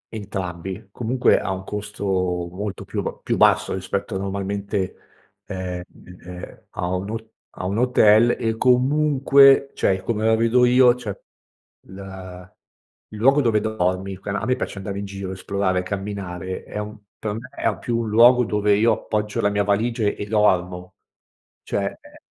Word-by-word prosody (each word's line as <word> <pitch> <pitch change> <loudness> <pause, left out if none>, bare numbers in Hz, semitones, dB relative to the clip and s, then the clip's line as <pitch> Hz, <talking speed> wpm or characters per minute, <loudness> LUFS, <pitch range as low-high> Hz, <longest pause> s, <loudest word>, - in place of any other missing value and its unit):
Entrambi, 95 -2 -6
comunque 125 +3 +2
ha 95 - -3
un 95 0 -4
costo 105 0 -6
molto 90 +1 -2
più - - -3
b - - -6
più - - 0
basso - - +3
rispetto 95 +2 -3
normalmente, 100 0 -3 0.5
ehm, 90 -1 -5 0.4
ehm, 90 0 -10
a 90 - -4
un 95 +3 -4
hot 110 0 -6 0.2
a - - -6
un 100 +5 -1
hotel 120 -2 +5
e 115 0 0
comunque 135 +1 +4
cioè, 95 -1 0
come 110 +1 -2
la 110 0 +4
vedo 115 +2 +3
io 125 0 +6
cioè, 110 -6 -7 0.7
la 95 -1 -10 0.6
il 110 - -9
luogo 135 +5 +5
dove 115 -4 +2
dormi, 95 -3 -1
quan 100 +1 -5
a - - -2
me 130 - +2
piace 115 - -5
andare 100 0 -5
in 100 - -4
giro, 100 -1 -6
esplorare, 95 0 -1
camminare, 95 -2 -5
è - - -8
un 105 +1 -6 0.2
per 105 -1 -3
me 120 +4 -7
è - - -1
più 120 -1 -2
un 115 -2 -2
luogo 120 +3 +6
dove 105 0 +2
io 115 +3 +3
appoggio 105 -1 -2
la 105 - +2
mia 105 0 +1
valigia 110 +4 0
e 100 - -1
dormo 90 -4 +1 0.7
cioè, - - -2 0.2
eh - - -17
105 Hz, 160 wpm, -22 LUFS, 95-115 Hz, 0.7 s, io